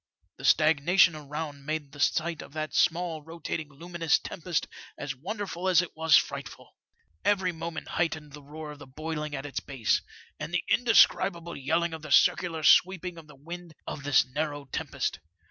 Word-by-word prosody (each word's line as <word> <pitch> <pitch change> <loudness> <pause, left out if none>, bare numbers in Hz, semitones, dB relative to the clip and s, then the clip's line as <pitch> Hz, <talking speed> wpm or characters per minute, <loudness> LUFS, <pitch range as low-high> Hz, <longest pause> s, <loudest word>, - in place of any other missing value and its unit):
The - - -7
stagnation 160 +3 +5
around 150 -1 -6
made 150 -1 -3
the 145 - -13
sight 165 +2 +1
of - - -12
that 155 0 -4
small 170 -2 +1
rotating 160 -1 -5
luminous 165 +1 0
tempest 170 -1 -3 0.3
as 145 -2 -4
wonderful 190 - -3
as 180 -1 +5
it 175 - -9
was 160 -1 +5
frightful. - - -4 0.5
Every 190 -3 +2
moment 165 -1 -6
heightened 155 -3 -2
the 150 - -10
roar 150 +2 -8
of 150 - -11
the 145 - -11
boiling 150 +2 -4
at 135 +1 -5
its 145 - -3
base, 130 -6 0 0.4
and - - -5
the 180 - 0
indescribable 175 -7 +4
yelling 160 +5 0
of 160 - -6
the 155 -1 -9
circular 165 -3 +3
sweeping 180 +1 +4
of 155 - -14
the 150 - -14
wind 170 +3 -9
of 140 - -5
this 140 -4 +4
narrow 145 +2 -3
tempest. - - -2
160 Hz, 170 wpm, -28 LUFS, 145-170 Hz, 0.5 s, stagnation